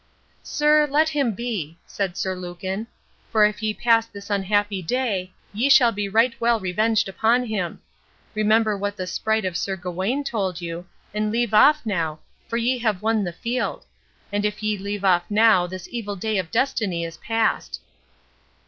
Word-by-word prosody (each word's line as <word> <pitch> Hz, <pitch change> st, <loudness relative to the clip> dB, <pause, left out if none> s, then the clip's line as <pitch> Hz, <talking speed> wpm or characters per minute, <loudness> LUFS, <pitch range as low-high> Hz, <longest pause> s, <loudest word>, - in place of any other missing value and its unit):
"Sir, 300 Hz, 0 st, +3 dB
let 310 Hz, +3 st, +3 dB
him 280 Hz, -7 st, 0 dB
be," 200 Hz, -9 st, -4 dB
said 195 Hz, -3 st, -3 dB
Sir 190 Hz, -, -1 dB
Lucan; 185 Hz, +4 st, -5 dB, 0.4 s
"for 215 Hz, -2 st, +5 dB
if 210 Hz, +1 st, -1 dB
ye 215 Hz, 0 st, 0 dB
pass 230 Hz, +1 st, +2 dB
this 200 Hz, -1 st, -10 dB
unhappy 205 Hz, 0 st, +1 dB
day, 195 Hz, -2 st, -1 dB, 0.2 s
ye 235 Hz, +7 st, +1 dB
shall 260 Hz, -4 st, +7 dB
be 205 Hz, -2 st, -3 dB
right 230 Hz, +4 st, +3 dB
well 235 Hz, -1 st, +3 dB
revenged 215 Hz, +4 st, +1 dB
upon 230 Hz, +6 st, +2 dB
him. 200 Hz, -7 st, -3 dB, 0.5 s
Remember 215 Hz, 0 st, +2 dB
what 205 Hz, +1 st, -3 dB
the 185 Hz, -, -3 dB
sprite 220 Hz, +4 st, -1 dB
of 185 Hz, -2 st, -2 dB
Sir 195 Hz, +2 st, -1 dB
Gawain 190 Hz, +9 st, -2 dB
told 195 Hz, -9 st, -2 dB
you, 170 Hz, 0 st, -6 dB, 0.3 s
and 210 Hz, 0 st, -1 dB
leave 235 Hz, -1 st, 0 dB
off 300 Hz, +6 st, +6 dB
now, 165 Hz, -7 st, -1 dB, 0.3 s
for 230 Hz, -, -2 dB
ye 245 Hz, +2 st, +1 dB
have 215 Hz, -5 st, -1 dB
won 220 Hz, -1 st, +2 dB
the 175 Hz, -, -3 dB
field; 235 Hz, +8 st, -3 dB, 0.5 s
and 205 Hz, 0 st, 0 dB
if 210 Hz, +1 st, -2 dB
ye 215 Hz, 0 st, +1 dB
leave 200 Hz, 0 st, -4 dB
off 175 Hz, -2 st, +3 dB
now 210 Hz, -4 st, +4 dB
this 185 Hz, 0 st, -8 dB
evil 210 Hz, -4 st, -4 dB
day 215 Hz, +1 st, -1 dB
of 170 Hz, -3 st, -4 dB
destiny 210 Hz, -10 st, 0 dB
is 165 Hz, 0 st, -8 dB
past." 225 Hz, -1 st, -1 dB
210 Hz, 175 wpm, -23 LUFS, 185-230 Hz, 0.5 s, shall